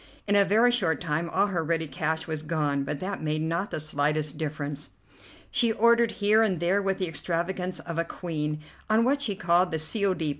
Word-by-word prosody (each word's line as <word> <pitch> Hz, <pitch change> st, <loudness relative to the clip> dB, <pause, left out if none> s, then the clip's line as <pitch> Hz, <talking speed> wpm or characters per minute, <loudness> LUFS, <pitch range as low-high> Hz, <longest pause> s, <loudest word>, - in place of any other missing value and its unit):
In 205 Hz, -, +3 dB
a 200 Hz, -, +7 dB
very 220 Hz, +5 st, +4 dB
short 185 Hz, -10 st, +1 dB
time 165 Hz, 0 st, -2 dB
all 195 Hz, +4 st, +2 dB
her 180 Hz, -5 st, -1 dB
ready 165 Hz, 0 st, 0 dB
cash 160 Hz, +3 st, -2 dB
was 155 Hz, -2 st, -3 dB
gone, 150 Hz, -3 st, -1 dB
but 140 Hz, +1 st, -4 dB
that 195 Hz, +2 st, -4 dB
made 155 Hz, 0 st, -1 dB
not 170 Hz, +5 st, -1 dB
the -, -, -3 dB
slightest 150 Hz, 0 st, -1 dB
difference. 150 Hz, -2 st, -4 dB, 0.6 s
She 235 Hz, -3 st, +2 dB
ordered 235 Hz, +1 st, +4 dB
here 210 Hz, +2 st, +3 dB
and 195 Hz, -6 st, +1 dB
there 180 Hz, +4 st, +2 dB
with 195 Hz, -1 st, 0 dB
the 185 Hz, -, -1 dB
extravagance 180 Hz, +2 st, -2 dB
of 165 Hz, -1 st, -4 dB
a -, -, +2 dB
queen, 155 Hz, -3 st, -4 dB, 0.3 s
on 220 Hz, +1 st, +4 dB
what 280 Hz, +4 st, +2 dB
she 210 Hz, -8 st, 0 dB
called 180 Hz, -1 st, +2 dB
the 160 Hz, -, 0 dB
"C. 180 Hz, +7 st, -1 dB
O. 195 Hz, -2 st, +3 dB
D." 160 Hz, -4 st, -1 dB
170 Hz, 215 wpm, -27 LUFS, 155-200 Hz, 0.6 s, a